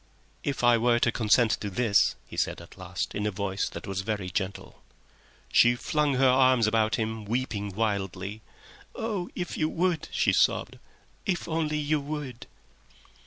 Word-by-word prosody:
"If 140 -3 -2
I 120 -1 +5
were 120 +1 +3
to 120 0 +2
consent 115 0 +3
to 105 - -3
this?" 105 +2 +2
he - - -11
said - - -1
at 85 - -13
last, 95 -1 -4
in 105 +1 -1
a - - +2
voice 100 0 -2
that - - -8
was 95 -1 -3
very 100 -3 -3
gentle. 95 +2 -4 0.7
She 120 0 +6
flung 150 +2 0
her 135 +1 +4
arms 130 -2 +5
about 110 +1 +2
him, 110 -1 -3
weeping 110 -2 -2
wildly. 100 -1 -2 0.5
"Oh, 210 -6 -3
if 175 -1 -4
you 155 -1 +2
would," 170 -2 0
she - - +2
sobbed, - - +1 0.5
"if 180 -3 -1
only 160 -2 -1
you 150 0 +1
would!" 140 -4 -6
120 Hz, 165 wpm, -27 LUFS, 105-145 Hz, 0.7 s, She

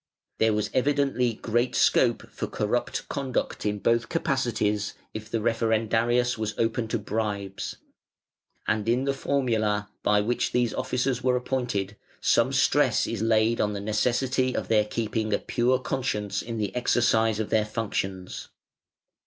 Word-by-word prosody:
There 110 -1 +3
was 105 0 -1
evidently 135 -3 +1
great 120 +3 0
scope - - +3
for - - -4
corrupt 105 +4 -2
conduct 135 -5 -2
in 105 0 0
both 115 +3 +1
capacities, 120 -9 0 0.2
if 110 0 -7
the 115 - 0
Referendarius 115 +1 +1
was 110 -1 -2
open 115 0 0
to 110 - -1
bribes; 100 -2 -3 0.9
and 105 +1 0
in 125 +3 +2
the 140 0 +1
"Formula", 110 -7 0
by 105 0 +3
which 120 +4 -1
these 120 -2 +1
officers 125 0 -1
were 125 0 +3
appointed, 120 -6 -2 0.2
some - - +3
stress - - +3
is 115 -3 -3
laid 110 +1 +2
on 105 0 0
the 100 - -3
necessity 125 +5 0
of - - -3
their 105 -2 +4
keeping 110 0 -2
a - - +4
pure 125 +2 +1
conscience 115 -6 -2
in 115 -1 -5
the 105 0 -2
exercise 115 -3 +2
of 110 - -3
their 110 -1 +3
functions. 100 -4 -4
115 Hz, 145 wpm, -26 LUFS, 105-125 Hz, 0.9 s, their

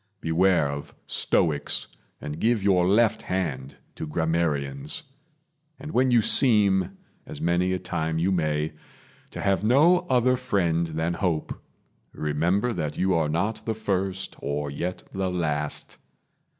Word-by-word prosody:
Beware 85 -1 +2
of 70 0 -6
stoics, 75 -4 0 0.3
And 75 +1 -6
give 115 -1 +1
your 90 -3 +3
left 110 +3 +3
hand 75 -8 -3 0.2
to 80 - -6
grammarians; 75 - -1 0.8
And 150 +3 -7
when 130 -1 +2
you 120 -3 +4
seem, 100 -7 +4 0.3
as - - -8
many 90 +2 +1
a 95 - 0
time 80 -3 -2
you 90 +4 +1
may, 75 -3 0 0.6
To - - -7
have 100 0 +1
no 150 +11 +5
other 125 0 +3
friend 85 -9 0
than 80 +1 -2
hope, 85 -3 -2 0.5
remember 85 +10 0
That 75 -7 -3
you 95 0 +2
are 80 -3 +1
not 100 +8 -1
the 110 - -1
first, 95 -3 -2
or 70 +1 -3
yet 90 +6 -4
the 95 -1 -1
last. 75 -5 -2
90 Hz, 135 wpm, -25 LUFS, 80-100 Hz, 0.8 s, no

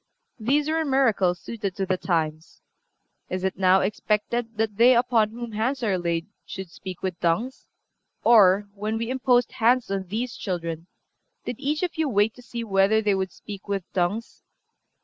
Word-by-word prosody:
These 280 +7 +1
were 320 +1 +1
miracles 225 - +2
suited 205 -4 -5
to 195 - -1
the 185 0 +1
times.... 160 -3 -2 0.7
Is 185 0 -3
it 190 - 0
now 190 0 +4
expected 215 +3 -1
that 215 -2 -1
they 245 +2 +6
upon 235 -3 +3
whom 235 +1 -7
hands 240 +5 -1
are 195 -5 +1
laid 170 -1 -1 0.2
should 190 -3 -8
speak 185 0 -9
with 185 -2 -3
tongues? 215 +10 -1 0.6
Or, 205 -3 +6
when 210 +2 -3
we 230 +2 -3
imposed 250 -2 +2
hands 240 0 +2
on 195 -1 -2
these 230 +6 -3
children, 170 -3 -4 0.6
did 240 - -5
each 300 +4 -1
of 355 - -2
you 315 -3 +1
wait 210 -1 +2
to 250 - -15
see 240 -1 -6
whether 200 0 +3
they 210 -2 +2
would 190 -1 -1
speak 200 +1 -10
with 200 -2 -2
tongues?... 195 +5 -2
210 Hz, 170 wpm, -25 LUFS, 190-240 Hz, 0.7 s, they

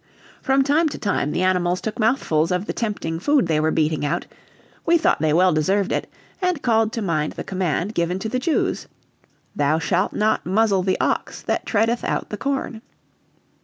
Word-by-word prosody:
From 270 0 +3
time 305 +4 +2
to - - -6
time 200 -8 -1
the 180 - -1
animals 180 -1 +1
took 220 +2 -5
mouthfuls 215 - +1
of 180 +2 0
the - - -3
tempting 200 -8 -3
food 285 - +2
they 160 -2 +1
were 155 +1 +2
beating 155 -1 0
out; 155 +4 -1 0.6
we 340 +1 +4
thought 325 - +2
they 155 -1 +2
well 180 +3 +4
deserved 190 +6 +1
it, - - -2 0.3
and 360 -5 0
called 225 -2 +2
to 225 - -2
mind 155 -5 -1
the - - -6
command 185 +1 -2
given 170 -1 0
to 195 - -4
the 255 +3 -1
Jews, 305 +4 -1 0.7
"Thou 145 +2 +2
shalt 180 +3 0
not 215 +1 +1
muzzle 195 +1 +2
the 185 0 0
ox - - -1
that - - -2
treadeth 225 +2 +1
out - - -2
the 210 - -3
corn." 270 -4 -3
195 Hz, 190 wpm, -22 LUFS, 170-230 Hz, 0.7 s, we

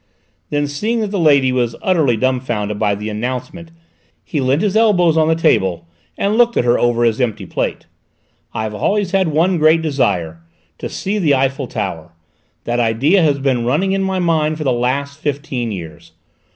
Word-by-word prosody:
Then, 145 0 0
seeing 215 +12 -2
that 210 -2 -3
the 200 - -1
old 165 - +3
lady 140 -3 +4
was 120 -2 -1
utterly 155 -11 +1
dumbfounded 120 -5 -1
by 100 - +1
the 105 +2 -6
announcement, 125 +9 -5 0.5
he 150 - -3
leant 135 +7 +1
his 205 -1 0
elbows 185 -7 +3
on 160 -1 +3
the 160 - +3
table 95 - +1 0.3
and 210 +3 0
looked 240 -1 +3
at - - +2
her 120 0 +3
over 120 0 +1
his 115 +1 +1
empty 115 -4 -2
plate. - - -3 0.7
"I've 110 -1 -4
always 195 - 0
had 190 -2 +2
one 165 +4 +1
great 160 +1 +4
desire 85 - -1 0.4
to - - -5
see 205 +2 -3
the 150 -7 +3
Eiffel 135 0 -1
Tower: 85 -8 -5 0.5
that 120 +1 -1
idea 125 - +2
has 150 -4 +2
been 135 -3 0
running 150 +11 +1
in 195 0 0
my 190 -1 -1
head 155 -3 +1
for 155 - -4
the 135 - +1
last 140 +4 -2
fifteen 140 -6 -3
years. 85 -6 -9
140 Hz, 185 wpm, -17 LUFS, 120-170 Hz, 0.7 s, lady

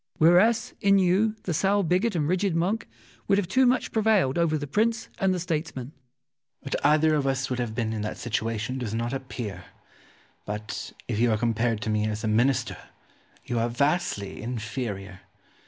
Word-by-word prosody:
Whereas 195 +7 +4
in 200 0 +5
you 195 +4 +3
the 175 - -2
sour 195 +5 +2
bigot 185 +5 +1
and 150 -3 0
rigid 185 +1 +1
monk 190 +7 0 0.4
would 195 -2 +2
too 260 +7 +4
much 250 +1 +3
have - - -9
prevailed 215 - +2
over 160 -2 +2
the 145 - -4
prince 225 +9 0
and 195 -3 +2
the 185 - 0
statesman. 155 -6 -3
Ximenes. - - -31 0.7
What 140 - -3
either 155 +1 +4
of 145 -2 +1
us 135 0 -1
would 125 - -1
have 115 -3 -3
been 110 -2 -1
in 110 - -3
that 105 - -4
situation 115 +2 -2
does 115 -3 -3
not 120 +2 -2
appear; 115 -8 -5 0.8
but, 105 +1 -5 0.2
if 110 -3 -2
you 120 +1 +3
are 110 - +2
compared 115 0 0
to 110 - -2
me 105 0 +1
as 110 +1 -3
a - - 0
Minister, 120 +5 +1 0.7
you 120 -1 -1
are 115 +1 +1
vastly 140 - -1
inferior. 110 -5 -5
135 Hz, 185 wpm, -26 LUFS, 115-185 Hz, 0.8 s, in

